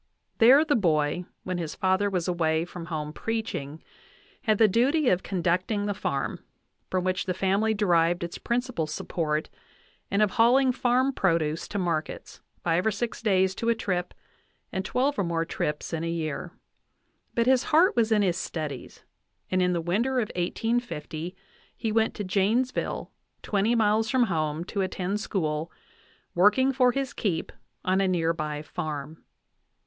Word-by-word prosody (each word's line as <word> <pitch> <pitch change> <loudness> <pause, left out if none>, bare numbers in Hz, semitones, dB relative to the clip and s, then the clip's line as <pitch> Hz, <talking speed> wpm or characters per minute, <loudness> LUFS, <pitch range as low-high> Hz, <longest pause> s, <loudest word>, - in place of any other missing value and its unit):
There 265 +7 +7
the 300 - +2
boy, 165 -4 +1 0.2
when 185 -1 -3
his 160 -3 -4
father 190 +1 +2
was 180 -3 -1
away 165 -2 +1
from 175 -1 -8
home 150 -2 -4
preaching, 160 -9 -4 0.6
had 215 -4 +2
the 220 - +6
duty 255 +7 +3
of 180 - +2
conducting 185 +3 0
the 205 - 0
farm, 140 -7 -3 0.5
from 185 -1 0
which 185 +1 -1
the 185 - -1
family 200 +4 +1
derived 175 -4 +2
its 170 - -5
principal 240 -9 -1
support, 155 0 -2 0.6
and 200 +1 +3
of 205 - +1
hauling 255 +5 +4
farm 255 +2 +2
produce 165 -6 0
to 205 - -4
markets, 170 -4 -3 0.2
five 170 +1 +2
or 220 - +3
six 220 +3 -3
days 190 -4 +2
to 230 +4 -2
a 230 - +3
trip 180 -5 -2 0.6
and 190 - -2
twelve 255 +5 0
or - - +2
more 165 -1 -1
trips 150 0 -3
in 165 0 -2
a 165 - -2
year; 165 +1 -3 0.8
but 235 - +2
his 260 0 +3
heart 330 +5 +4
was 230 -2 +2
in 210 -2 +4
his 180 -3 +1
studies, 150 -6 -5 0.5
and 185 0 +2
in 180 0 +2
the 175 - 0
winter 225 +10 0
of 215 - -1
1850 180 -3 -2 0.4
he 220 - -2
went 225 0 +1
to 210 - -4
Janesville, 210 +7 0 0.3
twenty 210 +3 +1
miles 220 0 +2
from 260 -2 +3
home, 155 -5 -1
to 195 +2 -3
attend 190 +1 -2
school, 160 -6 -2 0.6
working 210 +9 +4
for 250 -1 +4
his 270 0 -3
keep 180 -7 -2 0.3
on 185 +1 +2
a 195 - +2
near 165 -3 +1
by 150 -2 -4
farm. 155 0 -5
190 Hz, 165 wpm, -27 LUFS, 165-225 Hz, 0.8 s, There